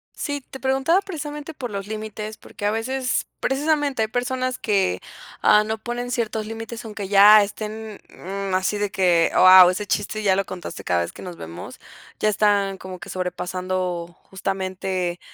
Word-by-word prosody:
Sí, 285 -1 -3
te 265 +1 -11
preguntaba 270 +8 +2
precisamente 300 -4 -6
por 245 -5 -5
los 200 -1 -5
límites, 215 0 -6
porque 205 - -8
a - - +2
veces, 255 +4 -1
precisamente, 285 -2 +1
hay - - 0
personas 255 +2 -2
que, 200 -3 +1 0.4
ah, 210 - +6
no 220 +1 -3
ponen 240 +2 -4
ciertos 220 -3 -2
límites, 225 +1 -7
aunque 210 -2 -6
ya 205 +2 +8
estén, 215 +1 -6
mm, 195 +1 -5
así 190 +3 +1
de 205 -1 -1
que: 180 -5 +3
"Guau, 185 -1 +9
ese 205 +3 -4
chiste 205 +2 -1
ya 195 -3 +3
lo 195 0 0
contaste, 185 -2 -7
cada 90 -1 +1
vez 85 - -3
que - - -11
nos 180 -2 -7
vemos". 85 - -9 0.4
Ya 215 - +2
están 200 -2 +2
como 185 -1 -9
que - - -10
sobrepasando, 180 -1 -3
justamente, 185 -2 -3
210 Hz, 170 wpm, -23 LUFS, 185-240 Hz, 0.4 s, Guau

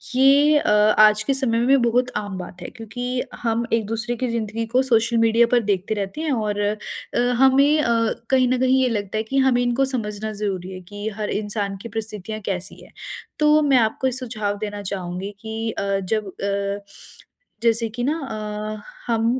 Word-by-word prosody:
ये 280 +3 +5
अ, 295 - 0 0.3
आज 215 0 +6
के 275 - +1
समय 260 -4 +3
में 260 +2 +4
बहुत 245 +2 +1
आम 205 -2 -4
बात 180 0 -9
है। - - -6
क्योंकि 245 +2 -4 0.2
हम 230 0 0
एक 225 -2 +2
दूसरे 225 +2 -2
की 255 +2 -2
ज़िंदगी 225 0 -2
को 255 - +5
सोशल 235 -2 +2
मीडिया 230 +1 +4
पर 245 - +5
देखते 195 +2 0
रहते 205 +8 -4
हैं 310 -3 -1
और 210 -4 -1
अ, 205 +1 +1 0.6
हमें 270 +2 +5
अ, - - 0 0.4
कहीं 260 -1 +4
न 255 0 +1
कहीं 260 0 +3
ये 255 - +2
लगता 205 -2 -2
है 220 - 0
कि 270 +5 -3
हमें 245 -1 +3
इनको 245 +2 +1
समझना 215 -1 -4
ज़रूरी 190 -3 -3
है 185 - -8
कि 205 +1 -6
हर 210 -1 -3
इंसान 205 -1 -2
की 235 - -7
परिस्थितियाँ 215 -1 -5
कैसी 185 0 -3
है। - - -17 0.5
तो 300 0 +5
मैं 280 -3 +4
आपको 230 +3 +1
ये - - 0
सुझाव 220 -5 -3
देना 205 -1 -5
चाहूँगी 190 0 -5
कि 225 0 -3
अ, 200 -1 -1
जब 210 +2 -2
अ, 200 +1 -3 0.8
जैसे 230 0 +3
कि 240 +3 -5
ना 295 +5 0
अ, 215 -4 -5 0.2
हम 225 -1 +1
225 Hz, 190 wpm, -22 LUFS, 205-250 Hz, 0.8 s, आज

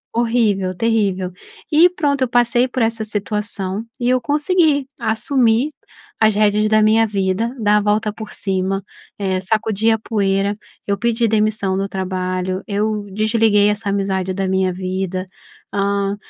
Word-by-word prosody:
U 235 - 0
horrível, 210 -6 +1
terrível, 200 -4 0 0.4
e, 320 +4 +6
pronto, 290 -6 -1
eu 255 - +2
passei 240 0 +3
por 255 -1 -2
essa 225 -1 0
situação 210 -1 -3 0.2
e 240 - 0
eu 255 0 +3
consegui 295 +2 +2
assumir 230 +2 +1 0.5
as 220 -1 +4
rédeas 210 0 +2
da 215 0 +4
minha 220 +1 +4
vida, 200 +3 -1
dar 210 -1 +3
a - - +4
volta 210 +1 0
por 215 0 -9
cima, 195 0 -2 0.4
eh, 190 -2 0
sacudi 215 +2 0
a 225 - +1
poeira, 200 -2 0 0.3
eu 200 0 -1
pedi 235 -1 +1
demissão 210 -3 +1
no 195 +1 -1
trabalho, 185 0 -2
eu 210 0 -1
desliguei 215 0 +3
essa 210 0 -1
amizade 190 -2 -1
da 195 0 -2
minha 190 -1 +1
vida, 185 0 -3 0.5
hã, 200 0 0
210 Hz, 150 wpm, -19 LUFS, 195-225 Hz, 0.5 s, e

